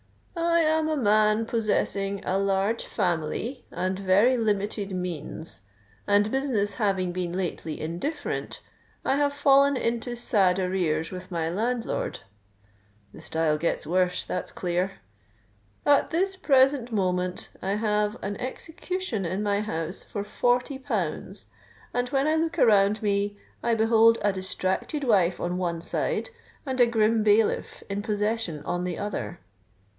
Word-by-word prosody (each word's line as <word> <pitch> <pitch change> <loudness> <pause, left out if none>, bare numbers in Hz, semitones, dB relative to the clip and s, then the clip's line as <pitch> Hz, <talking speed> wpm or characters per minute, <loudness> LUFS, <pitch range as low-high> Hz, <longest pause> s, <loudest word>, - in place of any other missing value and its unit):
'_I 335 0 +2 0.2
am 310 - -1
a 310 - 0
man 215 -2 +3
possessing 200 -3 -1
a 190 +1 +1
large 195 +3 +1
family 185 - -2
and 185 +1 -2
very 200 +6 +4
limited 205 -3 -1
means; 165 - -5 0.5
and 205 +1 +3
business 250 -7 0
having 195 -5 0
been 175 -1 -3
lately 175 -4 -3
indifferent, 280 - -4 0.4
I 270 - +2
have 290 0 +2
fallen 280 -1 +4
into 240 0 -2
sad 195 -6 +3
arrears 180 -4 0
with 185 0 -8
my 165 -2 -1
landlord._' 230 +5 -2 0.9
The - - -11
style 160 -2 0
gets 170 - -1
worse—that's 180 +2 -1
clear! 180 +2 -1 0.9
'_At 285 -1 +4
this 380 +4 0
present 270 -7 +3
moment 180 -3 -1
I 190 - -2
have 210 0 0
an 200 0 -3
execution 325 - -4
in 185 +4 -2
my 205 -1 +1
house 170 -3 -1
for 205 - -5
forty 245 +5 0
pounds; 200 - -3 0.5
and 245 0 0
when 270 +2 +1
I 310 - +3
look 325 +1 -1
around 210 -4 +4
me, 205 0 0 0.2
I 235 - +1
behold 225 +1 +5
a 205 - +3
distracted 190 - -2
wife 190 -8 +3
on 175 +1 -2
one 170 -2 -2
side, 485 - -2 0.3
and 260 -2 0
a 240 - +7
grim 225 -1 +2
bailiff 210 +1 +2
in 200 0 -3
possession 210 -6 -1
on 175 +3 -2
the 180 -2 -3
other. 205 -4 -4
205 Hz, 140 wpm, -26 LUFS, 185-245 Hz, 0.9 s, a